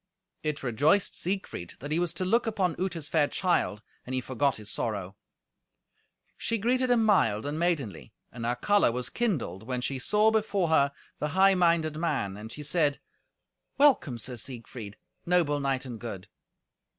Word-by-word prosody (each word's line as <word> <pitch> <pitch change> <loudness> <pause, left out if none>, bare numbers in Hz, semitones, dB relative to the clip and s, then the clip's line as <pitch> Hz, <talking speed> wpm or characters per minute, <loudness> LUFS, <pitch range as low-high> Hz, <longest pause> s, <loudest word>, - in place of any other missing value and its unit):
It 150 -2 -3
rejoiced 145 - +2
Siegfried 185 - -4
that 145 +3 -7
he 160 - +2
was 175 -2 0
to 185 - -2
look 230 +5 +2
upon 190 -6 0
Uta's 170 -5 -2
fair 150 -2 +3
child, 170 - 0 0.2
and 130 - -4
he - - +1
forgot 130 +2 0
his 105 -1 -10
sorrow. 100 -4 -3 1.2
She 230 - -1
greeted 250 +4 +1
him 235 -2 +4
mild 115 - +3
and 145 +2 -3
maidenly, 140 - -1 0.2
and 120 - -7
her 120 +1 0
colour 205 - +3
was 125 +1 -4
kindled 160 - -1
when 125 +3 -3
she 135 +1 -2
saw 210 +10 +3
before 205 -5 +1
her 140 -3 +4 0.3
the 150 - 0
high 195 0 +7
minded 170 -4 +2
man, 130 - -1
and 110 +2 -9
she 150 +5 -7
said, 150 -1 +1 0.8
"Welcome, 265 - +4
Sir 125 +2 -3
Siegfried, 115 -3 -6 0.3
noble 170 -5 +3
knight 135 -1 -1
and 120 -3 -7
good." 100 -6 -7
145 Hz, 165 wpm, -28 LUFS, 120-185 Hz, 1.2 s, high